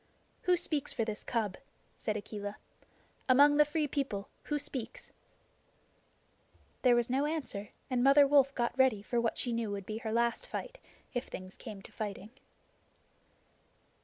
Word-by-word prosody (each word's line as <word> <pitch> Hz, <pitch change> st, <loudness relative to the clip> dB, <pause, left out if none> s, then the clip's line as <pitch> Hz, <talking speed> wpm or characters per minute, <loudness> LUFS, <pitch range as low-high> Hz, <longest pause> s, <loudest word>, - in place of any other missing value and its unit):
"Who 360 Hz, -, +6 dB
speaks 300 Hz, -4 st, +1 dB
for 225 Hz, -, 0 dB
this 215 Hz, -1 st, -3 dB
cub?" 215 Hz, -5 st, -1 dB, 0.4 s
said 215 Hz, -1 st, -2 dB
Akela. 205 Hz, 0 st, -6 dB, 0.7 s
"Among 285 Hz, +3 st, +7 dB
the 300 Hz, -, +8 dB
Free 300 Hz, 0 st, 0 dB
People 260 Hz, -8 st, -2 dB, 0.2 s
who 295 Hz, -, 0 dB
speaks?" 270 Hz, -5 st, -5 dB, 1.7 s
There 250 Hz, -2 st, +5 dB
was 240 Hz, -1 st, +2 dB
no 270 Hz, +4 st, +1 dB
answer 260 Hz, -10 st, -4 dB, 0.2 s
and 250 Hz, -2 st, +1 dB
Mother 280 Hz, +1 st, +7 dB
Wolf 275 Hz, -1 st, +4 dB
got 240 Hz, 0 st, 0 dB
ready 255 Hz, -6 st, +3 dB
for 235 Hz, +2 st, 0 dB
what 230 Hz, -, 0 dB
she 245 Hz, -, -1 dB
knew 230 Hz, -2 st, -1 dB
would 200 Hz, -1 st, -4 dB
be 215 Hz, +2 st, -4 dB
her 220 Hz, -2 st, -4 dB
last 235 Hz, +1 st, +1 dB
fight, -, -, -6 dB, 0.3 s
if 245 Hz, 0 st, -2 dB
things 185 Hz, 0 st, -8 dB
came 210 Hz, -5 st, -9 dB
to -, -, -13 dB
fighting. 205 Hz, 0 st, -5 dB
240 Hz, 155 wpm, -32 LUFS, 215-280 Hz, 1.7 s, the